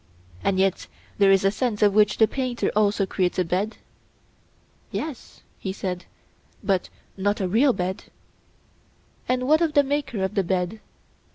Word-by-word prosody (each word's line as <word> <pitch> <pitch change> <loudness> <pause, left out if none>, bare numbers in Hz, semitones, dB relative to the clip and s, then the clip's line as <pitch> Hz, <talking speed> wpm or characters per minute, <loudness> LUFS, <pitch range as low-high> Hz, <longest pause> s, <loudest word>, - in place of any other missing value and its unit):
And 195 - +1
yet 190 -1 +1 0.3
there 200 -1 +6
is 195 0 +4
a 195 - +4
sense 215 -1 -1
in 205 -1 +5
which 210 0 +4
the 220 - +5
painter 255 -2 -2
also 205 -1 +2
creates 185 -1 -1
a 185 - +2
bed? 190 +6 -1 1.1
Yes, 300 -6 -6 0.2
he 190 - -3
said, 185 -2 -4 0.6
but 195 -3 0 0.3
not 205 +2 0
a 190 - 0
real 240 +9 +4
bed. 185 -3 -3 1.2
And 255 0 +1
what 310 +3 +4
of 325 -3 +1
the 285 - +5
maker 270 -7 -2
of 190 - -1
the 200 -3 +1
bed? 185 +3 -1
205 Hz, 160 wpm, -24 LUFS, 190-250 Hz, 1.2 s, there